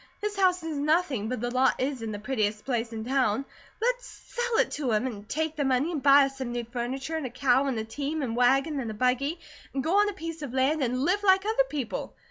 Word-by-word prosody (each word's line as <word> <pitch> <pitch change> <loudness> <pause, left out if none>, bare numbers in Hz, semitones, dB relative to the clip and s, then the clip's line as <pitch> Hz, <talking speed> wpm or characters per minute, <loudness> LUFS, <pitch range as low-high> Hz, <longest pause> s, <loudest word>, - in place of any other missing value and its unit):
This 420 0 -3
house 365 -3 +2
is 320 -2 -3
nothing, 295 - +1
but 250 -3 -3
the 240 0 -2
lot 255 +1 +2
is 265 -1 -1
in 225 -1 -4
the 205 - -4
prettiest 215 -2 -1
place 235 -3 -1
in 220 -1 -5
town. 260 -1 +1 0.3
Let's - - 0
sell 485 -1 -3
it - - +2
to 275 -5 -2
him, 215 +4 +1
and 215 -4 -6
take 315 0 -1
the 295 - 0
money, 270 +4 +1
and 305 -5 -3
buy 280 +1 +7
us 270 0 -7
some 255 -2 -3
new 240 0 -2
furniture 260 +6 -3
and 310 - -4
a - - -7
cow, 260 +2 +2
and 260 -4 -1
a 220 - -1
team, 285 +7 -3
and 230 -3 -2
wagon, 270 +5 +3
and 240 -4 -3
a 215 - -5
buggy, 255 +8 0 0.4
and 270 - 0
go 360 +7 +3
on 415 0 +4
a - - -4
piece 330 -3 -6
of 270 -3 -5
land, 280 +4 +2
and 255 0 0
live 385 +5 +2
like 385 -1 +4
other 450 +4 +2
people. 275 -6 -4
270 Hz, 255 wpm, -27 LUFS, 245-320 Hz, 0.4 s, buy